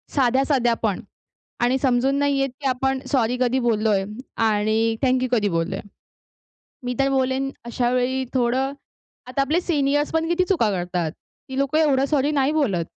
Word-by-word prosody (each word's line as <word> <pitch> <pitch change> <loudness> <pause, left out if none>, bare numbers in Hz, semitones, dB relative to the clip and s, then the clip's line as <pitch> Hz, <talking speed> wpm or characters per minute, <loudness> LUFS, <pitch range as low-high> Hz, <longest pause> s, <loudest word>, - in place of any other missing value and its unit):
साध्या-साध्यापण 245 -5 +1 0.6
आणि 250 +2 +3
समजून 260 +1 +2
नाही 285 -1 +1
येत, 270 0 +1
की 275 - -1
आपण 265 +1 0
सॉरी 250 -2 +1
कधी 255 +1 +2
बोललोय 215 -4 +1 0.4
आणि 220 +1 +1
थॅंक 255 -1 +2
यू 255 - -1
कधी 215 -4 +2
बोललोय. 170 +2 -2 1.0
मी 250 0 -2
तर 275 0 +3
बोलेन 265 0 0 0.2
अशा 240 +1 -1
वेळी 255 +1 0
थोडं 260 +2 +1 0.5
आता 255 +2 -1
आपले 300 +5 +1
सिनिअर्स 290 -3 0
पण 325 0 +1
किती 345 +2 +2
चुका 330 - +2
करतात. 175 -3 -2
ती 265 +9 -13
लोकं 275 +2 +1
एवढं 275 -4 +3
सॉरी 290 0 +1
नाही 280 -1 +2
बोलत. 225 - 0
260 Hz, 155 wpm, -22 LUFS, 230-275 Hz, 1.0 s, आणि